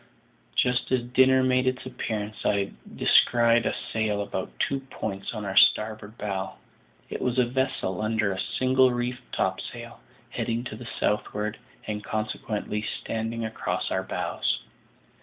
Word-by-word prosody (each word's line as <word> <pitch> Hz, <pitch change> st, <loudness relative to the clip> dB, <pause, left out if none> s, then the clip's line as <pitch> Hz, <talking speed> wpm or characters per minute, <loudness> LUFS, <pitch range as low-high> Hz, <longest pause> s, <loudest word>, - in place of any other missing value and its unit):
Just 125 Hz, +1 st, +2 dB
as 130 Hz, -2 st, +2 dB
dinner 130 Hz, +1 st, +4 dB
made 130 Hz, 0 st, +3 dB
its 130 Hz, 0 st, 0 dB
appearance 110 Hz, -2 st, -4 dB
I 100 Hz, -1 st, +1 dB, 0.2 s
descried 115 Hz, -1 st, +5 dB
a -, -, 0 dB, 0.2 s
sail 105 Hz, -2 st, +1 dB
about -, -, -4 dB
two 135 Hz, -, +1 dB
points 110 Hz, -7 st, -5 dB
on 110 Hz, -3 st, -5 dB
our 95 Hz, -1 st, -3 dB
starboard 110 Hz, 0 st, +4 dB
bow. 95 Hz, -2 st, -3 dB, 0.6 s
It -, -, -4 dB
was 125 Hz, 0 st, 0 dB
a 125 Hz, -, +5 dB
vessel 120 Hz, -6 st, -1 dB
under 110 Hz, -2 st, +1 dB, 0.2 s
single 130 Hz, 0 st, +5 dB
reefed 120 Hz, 0 st, -3 dB
topsails, -, -, -3 dB, 0.3 s
heading 115 Hz, +1 st, -1 dB
to 125 Hz, -, -6 dB
the 120 Hz, +2 st, -9 dB
southward, 105 Hz, +1 st, -1 dB, 0.3 s
and 105 Hz, -1 st, -3 dB
consequently 110 Hz, -1 st, -2 dB
standing 115 Hz, +1 st, -3 dB
across 110 Hz, -, -2 dB
our -, -, +1 dB
bows. -, -, -1 dB
110 Hz, 140 wpm, -27 LUFS, 105-125 Hz, 0.6 s, descried